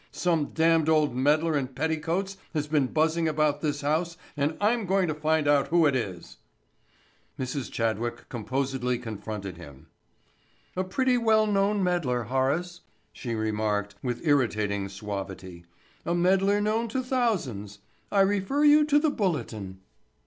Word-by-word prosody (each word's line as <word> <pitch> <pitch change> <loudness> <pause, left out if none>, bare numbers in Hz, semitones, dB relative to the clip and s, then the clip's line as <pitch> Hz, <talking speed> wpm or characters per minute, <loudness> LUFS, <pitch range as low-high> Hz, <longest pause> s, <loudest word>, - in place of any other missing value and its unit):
Some 165 -4 0
damned 160 -1 +2
old 155 -5 +3
meddler 150 +5 +2
in 140 -3 0
petticoats 160 +7 -2 0.2
has 150 -1 0
been 150 -3 +1
buzzing 160 +3 +1
about 150 -1 +1
this 145 -2 -1
house 160 +3 -1 0.2
and 145 +2 -1
I'm 215 0 +1
going 190 0 +2
to - - 0
find 155 0 0
out 145 -1 +3
who 170 -1 +3
it 140 -3 +3
is." 95 -8 -4 1.0
Mrs. 130 0 -4
Chadwick 115 0 -2
composedly 125 +2 -2
confronted 105 -5 -6
him. 75 -2 -13 0.9
"A 185 - 0
pretty 250 +6 +1
well 220 -2 +4
known 200 -1 +1
meddler, 155 -10 0
Horace," 140 +9 -1 0.3
she 120 -3 -4
remarked 105 -1 -1
with 125 +3 -4
irritating 105 -9 +1
suavity. 95 -3 -7 0.4
"A 170 - -1
meddler 195 +3 +3
known 215 +3 0
to 255 +4 -2
thousands. 175 - -1 0.3
I 200 - +4
refer 205 +8 +1
you 300 0 +6
to 295 -1 +3
the 295 0 +2
Bulletin." 110 - -3
150 Hz, 140 wpm, -27 LUFS, 120-185 Hz, 1.0 s, you